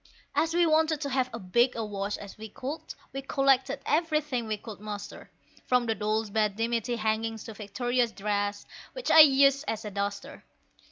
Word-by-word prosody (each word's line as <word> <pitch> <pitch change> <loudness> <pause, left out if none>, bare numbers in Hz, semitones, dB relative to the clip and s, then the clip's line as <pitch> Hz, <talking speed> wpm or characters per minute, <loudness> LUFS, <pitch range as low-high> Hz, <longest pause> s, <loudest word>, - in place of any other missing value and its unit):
As 330 +1 +1
we 345 0 +4
wanted 315 -1 +3
to 285 - -2
have 255 -1 +1
as 230 - -6
big 240 +5 +4
a 225 -1 -2
wash 200 0 -3
as 200 - -10
we 220 0 -9
could, 280 +9 -5 0.3
we 270 - -4
collected 275 0 +1
everything 300 -6 0
we 215 -1 -1
could 210 -1 -10
muster, 205 -1 -7 0.4
From 250 -1 +3
the 225 - +1
dolls' 215 0 -1
bed 210 -2 +1
dimity 230 +2 -1
hangings 220 0 -1
to 225 - -8
Victoria's 240 +3 -1
dress, 205 -1 -2 0.3
which - - -2
I'd 310 -1 +10
used 275 +1 +4
as 220 0 -3
a 210 - -5
duster. 200 0 -4
230 Hz, 180 wpm, -28 LUFS, 210-275 Hz, 0.4 s, I'd